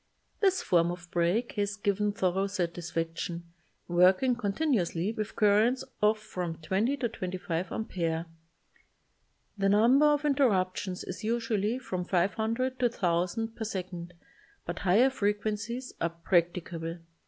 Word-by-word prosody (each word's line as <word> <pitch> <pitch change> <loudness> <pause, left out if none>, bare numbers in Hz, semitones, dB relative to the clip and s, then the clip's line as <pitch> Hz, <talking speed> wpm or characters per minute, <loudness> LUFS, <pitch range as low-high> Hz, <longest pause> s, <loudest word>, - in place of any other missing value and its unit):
This 385 -2 +2
form 170 -3 +3
of 175 0 -7
break 180 +7 +1
has 205 0 0
given 205 0 0
thoro 195 -1 0
satis 175 -3 -3
faction, 165 +1 -3 0.4
working 185 +8 +4
continuously 205 - 0
with 215 -1 -4
currents 215 +4 +3 0.2
of 210 +1 +4
from 180 -6 -5
20 195 - 0
to 250 - 0
25 185 -4 -4
amperes. 165 -6 -2 1.3
The 195 0 +3
number 240 +8 +5
of 295 0 +2
interruptions 195 -10 +1
is 185 +5 -7
usually 225 -1 0
from 185 -8 -4
500 220 +8 0
to 250 - +2
1,000 185 +1 -1
per 225 - -4
second 180 -4 -5 0.5
but 175 - -4
higher 215 +8 +4
frequencies 215 +3 -2
are 170 - +2
practicable. 170 -1 -1
200 Hz, 125 wpm, -29 LUFS, 175-225 Hz, 1.3 s, number